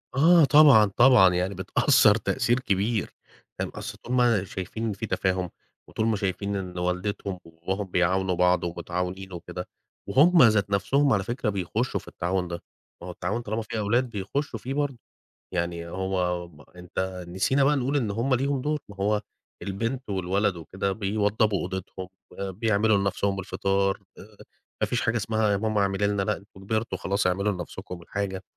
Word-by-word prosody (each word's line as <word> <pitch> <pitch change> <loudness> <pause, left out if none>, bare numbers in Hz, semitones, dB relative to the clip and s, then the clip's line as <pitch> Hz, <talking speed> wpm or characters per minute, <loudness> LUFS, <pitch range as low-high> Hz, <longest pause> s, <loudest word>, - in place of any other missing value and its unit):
آه 165 +4 +6
طبعًا، 145 -7 +7
طبعًا، 120 -8 +7
يعني 90 +2 0
بتأثَّر 105 - +4
تأثير 120 +2 +1
كبير. 105 -1 -1 0.5
تمام، - - -2
أصل - - -6
إن - - -1
هُم 115 -6 +3
شايفين 105 +4 -4
في 100 - -5
تفاهم 95 -1 -1 0.4
وطول 110 - -1
ما 110 - +2
شايفين 100 0 -2
إن 90 -2 -5
والدتهم 90 +2 -2
وباباهم 85 +5 -4
بيعاونوا 90 +1 +1
بعض 90 +1 +3
ومتعاونين 90 +2 -4
وكده 90 +1 -7 0.4
وهُم 165 +4 +6
ذات 110 -4 +4
نفْسهم- 130 +8 +2
على 100 -2 +1
فكرة- 120 +1 -2
بيخشوا 105 +5 -1
في - - -18
التعاون 90 +1 -2
ده، 85 0 -5 0.4
ما 90 - -8
هو - - -5
التعاون 95 +7 -3
طالما 110 0 -3
في 110 - -5
أولاد 120 +5 +1
بيخشوا 115 +4 -3
فيه 130 +5 -5
برضه، 140 -2 -1 0.6
يعني 85 -1 -2
هو 90 -1 -2
م 75 -3 -17
أنت 90 +1 -5
نسينا 95 +10 +1
بقى 145 +2 +4
نقول 135 +1 0
إن 115 -7 0
هُم 120 +5 +1
ليهم 135 +1 0
دور، 150 +2 -1
ما 100 - -11
هو 105 +1 0 0.4
البنت 115 +6 -3
والولد 95 +1 0
وكده 95 +4 -3
بيوضبوا 105 0 +1
أوضتهم، 95 0 -5 0.3
بيعملوا 105 +2 +1
لنفْسهم 100 0 0
الفطار، 95 0 0 0.2
آآ، 105 +1 -14 0.4
ما - - +2
فيش 125 - -1
حاجة 120 -1 +1
اسمها 110 0 0
يا 100 - +2
ماما 110 0 0
اعملي 100 +1 +1
لنا، 100 -1 0
لأ 105 +1 0
أنت 100 - -17
كبرتم 110 +4 -2
خلاص، 100 -1 0
اعملوا 100 +3 +1
لنفسكم 90 0 -7
الحاجة، 95 +1 -4
100 Hz, 165 wpm, -26 LUFS, 95-115 Hz, 0.6 s, طبعًا